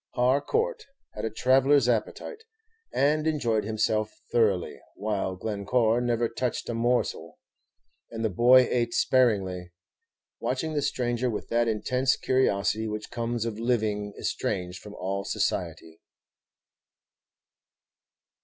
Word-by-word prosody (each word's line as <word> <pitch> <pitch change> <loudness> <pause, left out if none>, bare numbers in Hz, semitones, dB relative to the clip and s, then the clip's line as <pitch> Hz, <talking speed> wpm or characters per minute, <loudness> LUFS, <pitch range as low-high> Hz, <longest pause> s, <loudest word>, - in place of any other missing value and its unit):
Har 130 +3 +3
court 465 -2 -1 0.3
had 105 - -4
a - - 0
traveller's 130 +3 +3
appetite, 125 - -2 0.5
and 150 +2 +2
enjoyed 120 -9 +1
himself 110 0 0 0.2
thoroughly, 105 -7 +1 0.2
while 100 -2 -2
Glencore 110 +4 0
never 120 -1 +1
touched 120 +1 -3
a - - -1
morsel, 120 +2 -1 0.7
and 115 -1 -4
the - - +2
boy 125 +5 +6
ate 120 -1 0
sparingly, 95 -8 +2 0.7
watching 160 -4 -2
the 150 - 0
stranger 125 -2 -1
with 110 - -5
that 120 0 +2
intense 125 +4 +1
curiosity 110 -4 +1
which 105 0 -5
comes 120 -1 -2
of 110 -2 -4
living 110 -4 0
estranged 90 -3 -3
from 105 -1 -11
all 95 +2 -3
society. 80 -3 -3
115 Hz, 115 wpm, -27 LUFS, 105-125 Hz, 0.7 s, boy